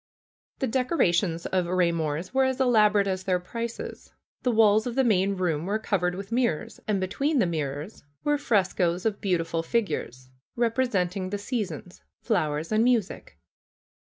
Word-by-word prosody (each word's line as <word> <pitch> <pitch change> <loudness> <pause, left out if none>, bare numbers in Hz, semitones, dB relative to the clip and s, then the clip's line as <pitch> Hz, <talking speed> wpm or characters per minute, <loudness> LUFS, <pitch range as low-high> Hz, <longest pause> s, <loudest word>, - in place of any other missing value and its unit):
The - - -1
decorations 205 - +1
of 185 -2 0
Eaymor's 170 - 0
were 265 0 +3
as 260 0 -1
elaborate 210 -5 +4
as 190 -1 -2
their 185 -1 +1
prices. 230 +6 -6 0.3
The 250 - +1
walls 220 0 +4
of 240 - -4
the 265 - +3
main 200 -4 +2
room 170 -3 -1
were 205 +2 +1
covered 180 -5 -1
with 195 +3 -8
mirrors, 235 -10 -1
and 210 -2 +1
between 275 - 0
the 235 - +4
mirrors 155 +2 -4 0.2
were 295 -1 +1
frescoes 185 -7 +1
of 215 -2 -1
beautiful 170 -3 0
figures, 160 - -3 0.2
representing 220 -6 0
the 205 - -2
seasons, 200 - -5 0.2
fiowers 160 -7 0
and 215 +1 +3
music. 235 -5 0
195 Hz, 150 wpm, -26 LUFS, 175-230 Hz, 0.3 s, elaborate